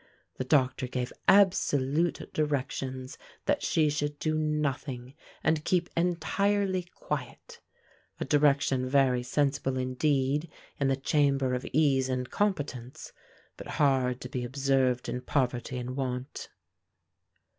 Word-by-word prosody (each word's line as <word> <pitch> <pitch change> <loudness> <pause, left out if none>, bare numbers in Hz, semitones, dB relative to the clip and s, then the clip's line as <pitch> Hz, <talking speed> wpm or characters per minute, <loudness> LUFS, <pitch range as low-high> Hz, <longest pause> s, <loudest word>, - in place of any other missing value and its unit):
The - - -1
doctor 130 -2 +2
gave 125 0 -3
absolute 170 -5 +3
directions 130 -3 -2 0.3
that - - +1
she 155 -2 +2
should 145 0 -2
do 155 +1 -1
nothing, 145 -4 -2 0.3
and 160 -1 +2
keep 175 0 0
entirely 185 +3 +1
quiet 475 -1 -6 0.6
a - - -2
direction 140 -3 +2
very 130 -2 +3
sensible 135 0 0
indeed 135 +3 0 0.3
in 140 - +2
the 135 - +2
chamber 135 -1 +1
of 125 - -3
ease 135 -3 +3
and 125 -1 -1
competence, 145 - -2 0.4
but - - -9
hard 130 -4 +2
to 125 - -6
be 125 -1 -3
observed 130 -1 +1
in 125 +1 -3
poverty 125 -2 -1
and 125 +1 -4
want. 130 0 -4
135 Hz, 120 wpm, -29 LUFS, 130-150 Hz, 0.6 s, absolute